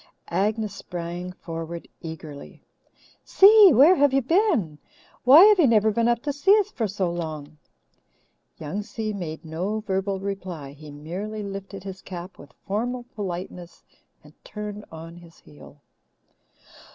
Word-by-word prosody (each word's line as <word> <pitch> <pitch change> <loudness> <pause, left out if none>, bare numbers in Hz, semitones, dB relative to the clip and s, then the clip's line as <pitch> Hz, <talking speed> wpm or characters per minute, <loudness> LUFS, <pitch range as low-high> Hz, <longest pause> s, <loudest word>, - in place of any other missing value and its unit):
Agnes 210 +3 -1
sprang 175 -1 -6
forward 165 -1 -7
eagerly. 160 -3 -10 0.6
"Si, 410 -1 +7
where 280 +8 +7
have 285 -5 +3
you 270 - +3
been? 250 - +1 0.5
Why 285 +8 +9
have 420 -2 +5
you 310 - +6
never 220 -2 +4
I - - +1
been 230 +2 +1
up 240 0 +1
to 290 -1 -2
see 385 +9 +4
us 415 - 0
for 225 - -2
so 190 -3 -2
long?" 155 -3 -6 1.0
Young 165 +6 -4
Si 215 0 -5
made 165 -5 -6
no 185 +7 -3
verbal 195 -1 -2
reply. 185 -7 -6
He 150 +2 -13
merely 185 +9 -6
lifted 195 -1 -7
his 190 -1 -8
cap 180 0 -9
with 140 - -14
formal 240 +5 -2
politeness 180 -3 -7 0.4
and - - -17
turned 210 0 -7
on 165 +1 -10
his 170 -1 -16
heel. 145 0 -17
195 Hz, 145 wpm, -24 LUFS, 170-225 Hz, 1.0 s, Why